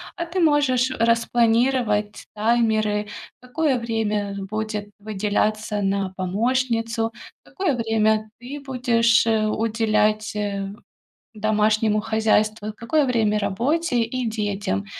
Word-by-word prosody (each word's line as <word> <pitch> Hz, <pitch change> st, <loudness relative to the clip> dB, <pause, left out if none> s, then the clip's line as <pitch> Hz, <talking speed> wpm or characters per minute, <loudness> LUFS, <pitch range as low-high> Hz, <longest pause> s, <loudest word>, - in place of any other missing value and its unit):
а 340 Hz, -, -3 dB
ты 345 Hz, +2 st, -3 dB
можешь 285 Hz, -6 st, +3 dB
распланировать 230 Hz, -2 st, +1 dB
таймеры: 215 Hz, -2 st, +1 dB, 0.3 s
какое 265 Hz, +2 st, 0 dB
время, 220 Hz, -3 st, -1 dB
э, -, -, -6 dB
будет 210 Hz, +1 st, -4 dB
выделяться 210 Hz, +1 st, -1 dB
на 195 Hz, -1 st, 0 dB
помощницу, 225 Hz, +3 st, 0 dB, 0.3 s
какое 370 Hz, -8 st, -2 dB
время 220 Hz, -2 st, +1 dB
ты 265 Hz, +4 st, -7 dB
будешь, 240 Hz, -4 st, +2 dB
э, 220 Hz, -1 st, +2 dB
уделять, 215 Hz, -1 st, 0 dB
э, 200 Hz, -1 st, -2 dB, 0.7 s
домашнему 215 Hz, 0 st, +2 dB
хозяйству, 215 Hz, -1 st, +1 dB
какое 295 Hz, +6 st, +1 dB
время- 220 Hz, -5 st, +1 dB
работе 245 Hz, -, 0 dB
и 245 Hz, +2 st, -2 dB
детям. 205 Hz, -, -2 dB
220 Hz, 105 wpm, -23 LUFS, 210-240 Hz, 0.7 s, можешь